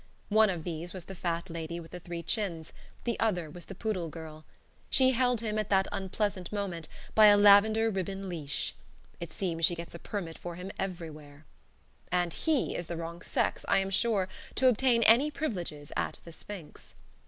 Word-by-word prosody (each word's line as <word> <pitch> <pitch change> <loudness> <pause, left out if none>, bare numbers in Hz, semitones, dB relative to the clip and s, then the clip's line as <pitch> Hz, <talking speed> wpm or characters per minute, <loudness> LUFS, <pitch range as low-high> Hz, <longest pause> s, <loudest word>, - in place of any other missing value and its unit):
One 215 0 +5
of 175 -4 -3
these 170 0 -5
was 185 -2 -7
the 195 - -8
fat 170 -1 -2
lady 170 0 -5
with 165 -1 -11
the 180 - -6
three 170 -1 -6
chins; 170 -8 -2 0.3
the 235 -2 -1
other 180 -8 0
was 175 0 -10
the 195 - -9
poodle 185 -5 -2
girl. 155 -1 -9 0.4
She 260 -1 +5
held 250 -2 +2
him, 215 -1 -1
at 215 - -2
that 195 -1 +3
unpleasant 195 -1 -2
moment, 190 -6 -3 0.3
by 215 -1 +8
a 205 0 +8
lavender 215 +2 +6
ribbon 195 0 -3
leash. 155 -6 -3 0.5
It 170 -2 -6
seems 165 -2 -3
she 170 +2 +5
gets 170 0 -8
a 170 - -8
permit 170 -5 -5
for 175 -1 -6
him 180 +3 -6
everywhere. 155 -5 -6 0.7
And 175 -2 +1
he 315 -4 0
is 175 - -4
the 170 - -4
wrong 170 +1 -6
sex, - - -1
I - - +4
am 195 0 0
sure, 200 -2 +2 0.3
to 260 - +4
obtain 245 -1 +3
any 240 +7 +6
privileges 175 - -4
at - - -1
"The 170 - -9
Sphinx." 170 -1 -10
185 Hz, 190 wpm, -30 LUFS, 170-210 Hz, 0.7 s, by